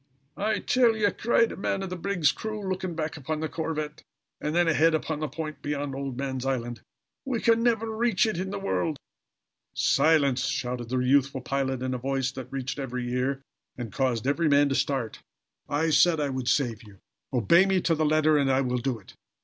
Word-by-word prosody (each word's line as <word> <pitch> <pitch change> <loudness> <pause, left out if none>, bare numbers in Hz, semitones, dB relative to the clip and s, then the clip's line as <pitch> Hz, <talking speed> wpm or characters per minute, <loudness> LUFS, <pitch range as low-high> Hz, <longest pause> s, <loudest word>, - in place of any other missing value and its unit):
"I 215 +2 0
tell 240 -3 +3
ye," 205 -2 +2
cried 230 0 +2
a - - -6
man 195 0 -2
of 190 - -5
the - - -2
brig's 175 -5 +1
crew, 215 -2 -5
looking 185 -2 -3
back 160 0 -3
upon 150 +2 -3
the 160 - -2
corvette 155 -1 -4 0.4
and 150 +2 -2
then 175 0 +3
ahead 165 0 +4
upon 155 -1 -2
the 155 - -2
point 155 0 -6
beyond 145 -1 -3
Old 135 -2 -4
Man's 130 -2 -3
Island, 120 -4 -2 0.4
"we 255 -4 -2
can 230 0 +3
never 225 -2 +1
reach 230 -2 +2
it 215 -6 -1
in 190 +1 -3
the 200 - -4
world!" 165 -5 -1 0.8
"Silence!" 140 -5 +3
shouted 125 -1 -3
the 130 - 0
youthful 135 +1 +2
pilot, 130 0 -2
in 130 0 -1
a 125 - -3
voice 135 0 -1
that 130 -2 -8
reached 135 +1 -4
every 125 -2 -3
ear, 135 +2 -1 0.3
and 115 -5 -6
caused 125 -4 0
every 150 +4 +2
man 140 0 +4
to - - 0
start. 135 -4 -1 0.5
"I 160 +3 +1
said 160 +1 +4
I 145 -1 0
would 130 -2 -4
save 120 -6 +1
you. 105 -3 -15 0.3
Obey 150 - +4
me 190 -1 +2
to 170 - +2
the 160 0 0
letter 155 0 +3
and 135 -1 +2
I 130 +1 +3
will 125 -1 -1
do 125 0 -1
it. 100 - -16
145 Hz, 205 wpm, -27 LUFS, 130-170 Hz, 0.8 s, ahead